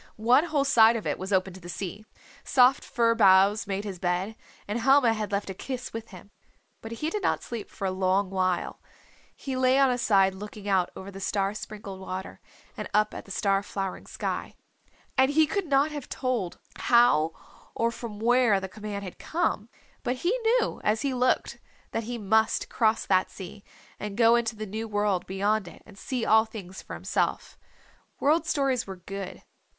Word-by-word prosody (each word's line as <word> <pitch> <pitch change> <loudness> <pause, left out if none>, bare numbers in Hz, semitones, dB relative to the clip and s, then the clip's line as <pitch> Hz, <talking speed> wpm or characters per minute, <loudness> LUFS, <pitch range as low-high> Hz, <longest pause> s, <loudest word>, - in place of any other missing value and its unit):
One 245 +8 +4
whole 295 -4 0
side 230 -4 +6
of 225 - -4
it - - -1
was 190 +2 -5
open 190 -1 +1
to 190 - -11
the 175 -1 -11
sea. 200 +3 -6 0.4
Soft 255 0 +4
fir 230 -1 +2
boughs 200 -1 +5
made 200 0 -2
his 195 -4 -6
bed, 180 +5 -1 0.3
and 210 +3 -2
Helma 260 -1 +5
had 215 -2 -4
left 200 -1 -2
a - - -5
kiss 255 +6 -6
with 225 0 -6
him. 195 +1 -13 0.5
But 225 +1 -7
he 305 +7 -3
did 420 - -2
not - - 0
sleep 235 -3 -6
for 195 - -6
a 190 - +1
long 190 +1 +1
while. 185 -2 -1 0.5
He 270 -2 -5
lay 255 0 +3
on 270 -2 +5
his 245 -1 -1
side 195 -4 +4
looking 205 +1 -9
out 190 -3 +2
over 190 +1 -8
the 195 - -9
star 195 0 -1
sprinkled 205 -2 -8
water 190 0 -6 0.3
and - - -6
up 215 0 +3
at - - -7
the - - -16
star 195 0 +1
flowering 195 -2 -5
sky. - - -4 0.6
And 265 0 +5
he 310 +2 +4
could 390 +4 -2
not 285 +2 +3
have 290 -3 -7
told 245 -9 -2 0.2
how 200 -10 +4 0.4
or 230 0 +1
from 230 -3 -7
where 235 -2 +4
the 190 - -5
command 205 +1 -6
had 185 - -9
come, 270 - -1 0.3
but 250 - -1
he 345 +8 0
knew 470 +1 +1
as 215 +1 +1
he 275 -2 0
looked 250 0 0 0.3
that 225 - -2
he 240 +1 -4
must 220 +1 +1
cross 220 -1 +1
that 185 -1 +2
sea 200 +2 -10 0.4
and 210 -1 -5
go 230 0 +6
into 235 -1 0
the 215 0 -5
new 220 +3 -5
world 205 -3 0
beyond 200 +1 0
it - - -13
and 210 - -15
see 245 +3 -3
all 220 +1 +5
things 195 -4 -9
for - - -8
himself. - - -2 0.6
World 315 +3 +2
Stories 270 -6 0
were 190 - -6
good. 195 +1 -7
215 Hz, 195 wpm, -27 LUFS, 195-245 Hz, 0.6 s, side